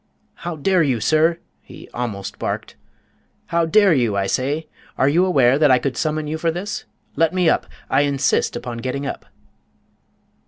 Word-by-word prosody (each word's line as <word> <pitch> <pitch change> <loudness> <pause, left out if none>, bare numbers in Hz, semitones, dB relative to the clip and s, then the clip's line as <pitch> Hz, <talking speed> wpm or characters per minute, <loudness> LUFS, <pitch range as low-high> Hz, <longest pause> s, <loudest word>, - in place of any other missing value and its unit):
"How 175 -2 -6
dare 180 +4 +2
you, 135 -7 +1
sir?" 155 +7 +2 0.2
he - - -13
almost 110 -5 -5
barked, - - -4 0.7
"how 170 -1 0
dare 200 +1 +5
you, 120 -7 +1
I 100 - +1
say? 140 +9 -1 0.3
Are 130 - +3
you 165 +6 +3
aware 135 -7 +3
that 150 -2 +5
I 130 - +6
could 125 +1 -2
summon 155 +2 -1
you 155 +1 -4
for 165 - +1
this? 200 +9 -4 0.3
Let 165 +4 +2
me 180 -2 +2
up. - - +2 0.2
I 135 - +3
insist 140 -2 +1
upon 120 -1 -5
getting 130 +4 -3
up!" - - -6
150 Hz, 170 wpm, -21 LUFS, 130-170 Hz, 0.7 s, I